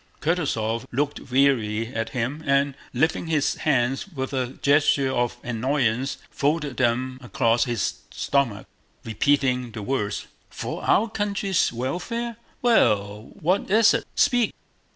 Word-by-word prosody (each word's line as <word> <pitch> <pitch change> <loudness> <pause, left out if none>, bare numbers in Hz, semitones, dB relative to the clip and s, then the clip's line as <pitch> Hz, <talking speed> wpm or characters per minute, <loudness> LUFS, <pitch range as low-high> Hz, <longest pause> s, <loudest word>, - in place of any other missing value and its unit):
Kutúzov 115 -9 -1
looked 140 0 -2
wearily 120 -4 +2
at 115 0 -2
him 130 +5 -3
and, 140 0 +3 0.2
lifting 160 +6 0
his 155 -3 +1
hands 135 -1 0
with 135 -8 -5
a 130 -1 -2
gesture 140 -2 +3
of 120 -2 0
annoyance, 125 +1 0
folded 145 -1 -1
them 130 +1 0
across 120 -2 +1
his 120 -5 -2
stomach, 130 -8 0 0.4
repeating 125 +1 +1
the 110 -2 -6
words: 105 -3 -2 0.2
"For - - -5
our 225 - +3
country's 200 -3 0
welfare? 210 - -3 0.3
Well, 105 - +2
what 185 +6 +1
is 220 +2 +5
it? - - 0
Speak!" 245 -5 +2
135 Hz, 125 wpm, -24 LUFS, 120-155 Hz, 0.4 s, is